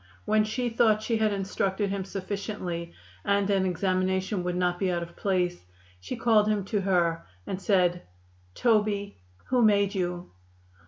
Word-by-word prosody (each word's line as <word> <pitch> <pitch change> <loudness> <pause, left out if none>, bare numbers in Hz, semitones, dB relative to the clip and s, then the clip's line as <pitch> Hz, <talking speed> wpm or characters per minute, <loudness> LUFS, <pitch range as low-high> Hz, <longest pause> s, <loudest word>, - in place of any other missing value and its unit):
When 215 0 +3
she 240 +4 -2
thought 225 -2 +3
she 230 0 0
had 215 -1 +2
instructed 195 0 -1
him 195 -1 -3
sufficiently 195 -3 -4 0.3
and 200 0 +2
an 190 -1 +2
examination 185 +1 0
would 180 0 -2
not 180 0 0
be 190 -2 +1
out 170 -1 -1
of 170 0 -11
place, 180 - -1 0.4
she 90 - -5
called 215 -3 +3
him 210 -3 0
to 205 - +2
her 170 -3 +1 0.2
and 190 0 -4
said: 180 -3 +2 0.5
"Toby, 210 - +1 0.3
who 255 -1 +3
made 200 -2 +4
you?" 180 -2 -3
195 Hz, 155 wpm, -27 LUFS, 180-210 Hz, 0.5 s, made